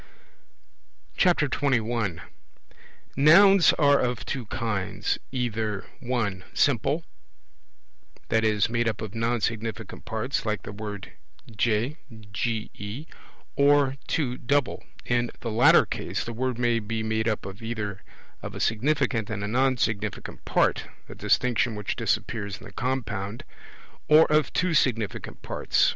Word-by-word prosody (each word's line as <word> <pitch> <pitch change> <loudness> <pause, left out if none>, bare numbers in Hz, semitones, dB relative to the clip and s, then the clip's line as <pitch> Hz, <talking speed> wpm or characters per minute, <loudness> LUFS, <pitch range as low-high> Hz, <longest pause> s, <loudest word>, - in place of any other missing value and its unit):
21 120 - +1 0.9
Nouns 190 +6 +7
are 145 -2 +4
of 120 -3 -1
two 125 -5 -4
kinds, 105 -5 -2
either 110 -6 -2
(1) 115 -8 -2
simple, 145 +4 +2 1.3
i.e. 110 -2 +2
made 115 0 0
up 110 -2 -1
of 110 -2 -6
non 115 +1 0
significant 110 -1 -3
parts, 110 +5 -2
like 105 -4 -2
the - - -7
word 105 -1 -7 0.4
ge, 115 +7 +1 1.6
or 140 -1 +4
(2) 125 -6 -1
double; 140 +1 0 0.2
in 120 -1 +1
the 115 - -3
latter 115 +3 +6
case - - -3
the 115 - -6
word 125 +1 -2
may 120 -1 +2
be 110 +1 -3
made 110 +1 0
up 110 -4 -1 0.2
either 105 -3 -4 0.4
of - - -7
a - - -5
significant 115 -2 +1
and 105 -2 -3
a - - -2
non 130 +3 +2
significant 105 -3 -3
part - - +1 0.2
(a - - -9
distinction 120 -2 +1
which 105 -1 -3
disappears 100 -3 -2
in - - -15
the 100 - -12
compound), 115 -4 -3 0.7
or 155 +1 +8
of 155 -1 +3
two 185 -2 +1
significant 115 -8 0
parts. - - +2
115 Hz, 125 wpm, -26 LUFS, 110-130 Hz, 1.6 s, or